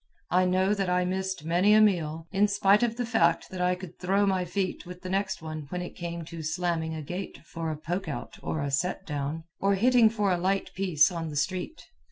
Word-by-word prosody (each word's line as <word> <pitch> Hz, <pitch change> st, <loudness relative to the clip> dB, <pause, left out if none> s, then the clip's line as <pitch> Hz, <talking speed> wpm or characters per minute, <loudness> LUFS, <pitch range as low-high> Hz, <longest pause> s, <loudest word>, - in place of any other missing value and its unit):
I 185 Hz, +1 st, +4 dB
know 185 Hz, +2 st, +2 dB
that 195 Hz, -3 st, -1 dB
I 180 Hz, 0 st, +2 dB
missed 190 Hz, -3 st, -2 dB
many 180 Hz, +6 st, +4 dB
a -, -, +7 dB
meal, 165 Hz, -6 st, +2 dB
in 200 Hz, +1 st, +3 dB
spite 200 Hz, +1 st, +4 dB
of 235 Hz, -1 st, +1 dB
the 245 Hz, -, -1 dB
fact 170 Hz, -8 st, +2 dB
that 185 Hz, -1 st, -4 dB
I 180 Hz, 0 st, +2 dB
could 180 Hz, -2 st, -10 dB
"throw 195 Hz, +3 st, +2 dB
my 190 Hz, -2 st, +1 dB
feet" 185 Hz, +1 st, -2 dB
with 180 Hz, +1 st, -10 dB
the 185 Hz, -, -5 dB
next 195 Hz, -3 st, -1 dB
one 155 Hz, -2 st, -6 dB
when 180 Hz, +2 st, -3 dB
it 175 Hz, -, -8 dB
came 170 Hz, -1 st, -5 dB
to 165 Hz, 0 st, -7 dB
"slamming 160 Hz, 0 st, -1 dB
a 155 Hz, -, -5 dB
gate" 180 Hz, +6 st, -5 dB
for 165 Hz, -1 st, -4 dB
a 155 Hz, -, -3 dB
"poke 175 Hz, +5 st, -3 dB
out" 150 Hz, -, -6 dB
or 160 Hz, -, -2 dB
a 140 Hz, -, -2 dB
"set 180 Hz, +7 st, -1 dB
down," 150 Hz, +1 st, -3 dB, 0.2 s
or 200 Hz, 0 st, +2 dB
hitting 240 Hz, +2 st, +5 dB
for 210 Hz, -3 st, 0 dB
a 175 Hz, -, +1 dB
"light 195 Hz, +2 st, 0 dB
piece" 180 Hz, -3 st, +3 dB
on 165 Hz, -2 st, -4 dB
the 150 Hz, -, -7 dB
street. 185 Hz, -, -2 dB
180 Hz, 235 wpm, -28 LUFS, 165-195 Hz, 0.2 s, a